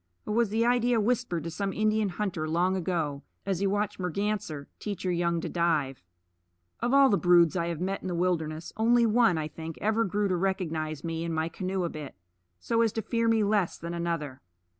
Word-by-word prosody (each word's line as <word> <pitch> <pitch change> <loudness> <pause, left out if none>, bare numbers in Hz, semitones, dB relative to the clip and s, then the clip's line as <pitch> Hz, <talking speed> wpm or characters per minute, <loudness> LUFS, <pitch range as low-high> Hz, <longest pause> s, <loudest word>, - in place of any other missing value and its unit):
Or 210 - -2
was 230 -1 +2
the 225 +3 +1
idea 245 -1 +3
whispered 220 -7 0
to 165 - -4
some 195 +4 -2
Indian 215 +1 +1
hunter 175 -5 -3
long 180 +4 +2
ago, 165 -6 -2 0.2
as 195 -3 -1
he 200 - +1
watched 205 +1 -1
Merganser 180 -5 -2
teach 205 -3 -5
her 185 - 0
young 170 -1 +1
to - - -3
dive? 160 -6 0 0.8
Of 240 +1 0
all 275 0 +7
the 200 - +3
broods 175 -1 +5
I 170 -2 0
have 170 -2 -3
met 190 +2 -2
in - - -5
the 180 - -2
wilderness, 165 -3 -1
only 235 +2 +4
one, 225 -5 +4
I 155 -1 -2
think, 160 +1 -8
ever 220 +2 +1
grew 205 +1 0
to 185 - +1
recognize 165 -5 -2
me 165 -1 -3
and 165 -1 -2
my 160 +1 0
canoe 185 +2 -2
a 170 - -1
bit, 150 -4 -8 0.4
so 230 - +1
as 225 -2 +3
to 225 - -2
fear 230 +1 0
me 225 -1 +3
less 205 -3 +1
than 170 +1 -6
another. 165 -6 -3
185 Hz, 210 wpm, -28 LUFS, 165-215 Hz, 0.8 s, all